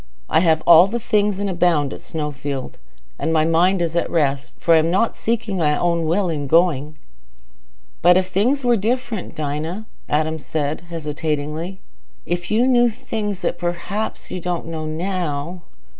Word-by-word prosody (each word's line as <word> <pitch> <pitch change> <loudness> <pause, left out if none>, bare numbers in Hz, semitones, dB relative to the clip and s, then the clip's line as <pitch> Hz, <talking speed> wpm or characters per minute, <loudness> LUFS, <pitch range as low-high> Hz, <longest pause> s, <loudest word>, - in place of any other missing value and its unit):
I 160 - +5
have 160 -2 +2
all 170 +2 +8
things 210 -3 0
and 200 0 -2
abound 170 -6 +1
at - - -9
Snowfield. 145 -4 -5 0.4
And - - -1
my 155 -1 +3
mind 175 +3 +3
is 165 0 -2
at 170 - 0
rest, 140 -4 0
for 170 - +3
I 160 - +7
am 160 +1 +1
not 195 +6 +1
seeking 225 -3 -2
my 150 -3 +2
own 170 -2 0
will 185 +4 +1
in 150 -4 -2
going." 155 -2 +2 1.0
"But 180 +1 +6
if 185 0 +1
things 250 +9 +1
were 240 -1 +4
different, 230 -1 -2
Dinah," 155 +7 -3 0.5
said 150 0 -2
Adam, 175 - -20
hesitatingly. 155 +2 -3 0.4
"If 175 0 -3
you 225 +4 +3
knew 245 -2 +4
things 210 -3 -4
that - - -1
perhaps 175 +5 -3
you 185 - -3
don't 175 -1 -3
know 160 -1 -5
now...." 170 -1 -3
170 Hz, 160 wpm, -21 LUFS, 155-195 Hz, 1.0 s, all